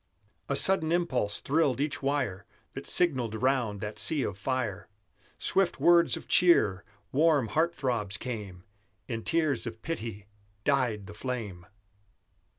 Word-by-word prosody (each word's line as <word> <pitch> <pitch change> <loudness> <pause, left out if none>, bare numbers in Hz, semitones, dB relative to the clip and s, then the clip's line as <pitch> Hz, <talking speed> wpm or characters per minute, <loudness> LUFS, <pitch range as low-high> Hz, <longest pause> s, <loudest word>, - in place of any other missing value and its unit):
A 140 - 0
sudden 160 0 +4
impulse 170 -12 0
thrilled 145 -3 +1
each 145 +1 -1
wire 130 -9 -2 0.3
That - - -7
signalled 130 -11 +2
round 125 -6 0
that 105 0 -5
sea 150 -4 +2
of 100 - -3
fire; 105 -2 -3 0.5
Swift 190 -2 +2
words 170 -1 +4
of - - -11
cheer, 105 - +4 0.3
warm 145 -5 +2
heart 165 +2 0
throbs 115 -7 -2
came; 105 -7 -7 0.4
In 115 -2 -4
tears 155 -8 0
of 110 -1 -8
pity 115 - -5 0.4
died 120 -7 0
the 100 - -10
flame! 105 -7 -6
125 Hz, 135 wpm, -28 LUFS, 105-155 Hz, 0.5 s, sudden